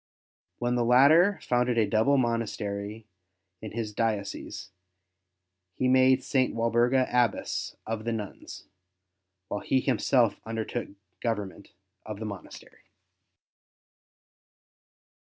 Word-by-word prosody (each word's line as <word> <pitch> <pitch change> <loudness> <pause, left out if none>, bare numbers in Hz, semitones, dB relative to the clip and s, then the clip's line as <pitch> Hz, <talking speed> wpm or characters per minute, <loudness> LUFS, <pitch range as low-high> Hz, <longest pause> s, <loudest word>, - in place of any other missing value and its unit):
When 120 0 -1
the 120 -1 +1
latter 145 - +5
founded 125 -1 +1
a 110 - +4
double 110 +7 +2
monastery 110 -3 -2 0.6
in 110 - -7
his 110 -2 -4
diocese, 105 -3 -3 1.0
he 130 - 0
made 130 0 +4
St. 130 -4 +1
Walburga 120 +3 +2
Abbess 120 -4 0
of 110 0 -4
the 115 - -2
nuns, 105 -3 -7 0.8
while 105 - -3
he 135 - +1
himself 125 -2 +1
undertook 115 +1 -4
the - - -18 0.3
govern 105 -4 -1
ment 100 - -17 0.3
of 105 -2 -7
the 110 - -6
monastery. 100 -5 -10
115 Hz, 110 wpm, -27 LUFS, 110-125 Hz, 1.0 s, latter